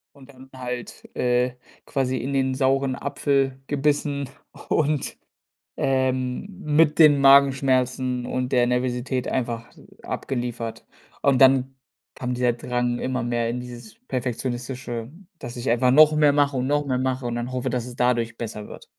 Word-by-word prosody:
Und 140 -1 -16
dann 130 -1 -15
halt, 125 -2 -7
äh, 125 0 +1 0.3
quasi 130 -1 -1
in 130 +4 -3
den 130 -1 +1
sauren 135 0 +1
Apfel 135 -1 -1
gebissen 145 -1 0 0.4
und 150 -2 0 0.6
ähm, 130 +1 0 0.2
mit 150 0 +3
den 145 -3 +7
Magenschmerzen 130 -2 +3
und 130 0 -2
der 125 -2 +4
Nervosität 125 +1 -1
einfach, 115 -3 -2
äh, - - -17 0.2
abgeliefert. 120 -3 -4 0.4
Und 140 -2 +3
dann 135 0 +5 0.4
kam 125 -1 -3
dieser 125 -1 +2
Drang 120 0 -2
immer 130 -1 -2
mehr 120 -1 -1
in 120 +2 -3
dieses 125 - -10
Perfektionistische, 125 - -4 0.3
dass 120 -4 -8
ich 120 +2 -4
einfach 120 +2 +3
noch 155 +3 +7
mehr 150 -1 +4
mache 145 -1 +2
und 125 - -1
noch 145 0 +1
mehr 130 -2 0
mache 130 0 -1
und 120 - -2
dann 120 +1 -3
hoffe, 130 0 -2
dass 125 -1 -2
es 125 -1 -9
dadurch 120 -2 +1
besser 105 -3 -6
wird. - - -11
130 Hz, 155 wpm, -24 LUFS, 125-135 Hz, 0.6 s, den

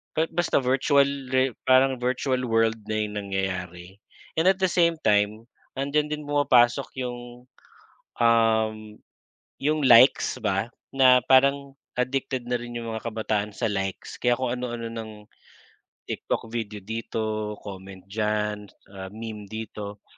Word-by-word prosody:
kahit 160 +1 +1
basta 175 -4 +2
virtually, 135 0 +2
parang 130 0 +4
virtual 130 +1 -1
world 115 -1 +2
na 110 - -1
yung 105 0 -4
nangyayari. 95 -2 -4 0.4
And 165 - +2
at 190 0 +4
the 190 - +4
same 170 -1 +3
time, 105 +1 +1 0.3
nandiyan 150 +2 0
din 150 - -4
pumapasok 140 -3 +3
'yong, 120 0 -7 0.7
um, 115 -1 +3 0.9
'yong 155 +2 +1
likes 125 +2 +6
ba 95 +4 0 0.2
na 130 -2 +6
parang 140 +1 +3 0.2
addicted 130 0 -1
na 125 -1 -1
rin 120 0 -8
'yong 115 -1 -4
mga 110 - -6
kabataan 105 -2 -2
sa 110 - -1
likes, 95 -1 -4
kaya 120 -1 +2
kung 125 -1 -2
ano-ano 120 -2 -4
ng 115 -1 -6 1.0
TikTok - - -3
video 110 -3 -4
dito, 110 -1 -3
comment 95 -1 -9
diyan, 105 0 -2 0.3
ah, 95 0 -7
meme 110 -1 -7
dito. 105 -2 -7
115 Hz, 130 wpm, -25 LUFS, 105-130 Hz, 1.0 s, likes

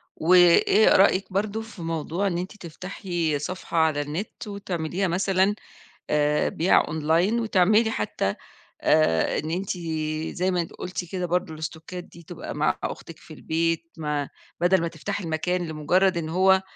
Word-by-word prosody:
وإيه 180 +5 +5
رأيِك 190 0 +4
برضه 210 +3 -1
في 220 -5 -11
موضوع 165 +3 -2
إن 175 -3 -1
أنتِ 185 +4 -5
تفتحي 175 -3 -3
صفحة 180 +2 -5
على 160 -2 +3
النِت 155 +10 -5
وتعمليها 190 -2 -2
مثلًا، 190 +3 +2 0.5
آآ، 150 0 +2
بيع 170 +4 +3
أونلاين 165 +8 +1
وتعملي 215 +1 +3
حتّى 100 - -2 0.5
آآ 115 - +3
إن 155 - -3
أنتِ 185 +2 -2 0.6
زي 185 +1 +1
ما 180 -1 +1
أنتِ 170 - -5
قُلتِ 180 0 -5
كده 180 -1 -2
برضه 175 -2 -1
الاستوكات 160 +3 -7
دي 170 - -15
تبقى - - -8
مع - - +1
أختِك - - -6
في - - -13
البيت 165 +1 -1
ما 150 -3 -2 0.3
بَدَل 180 +1 +4
ما 170 - -1
تفتحي 175 +4 -5
المكان 175 +2 -1
لمُجرّد 175 +5 +2
إن 165 -2 -2
هو 190 +3 +4
175 Hz, 150 wpm, -25 LUFS, 160-190 Hz, 0.6 s, وإيه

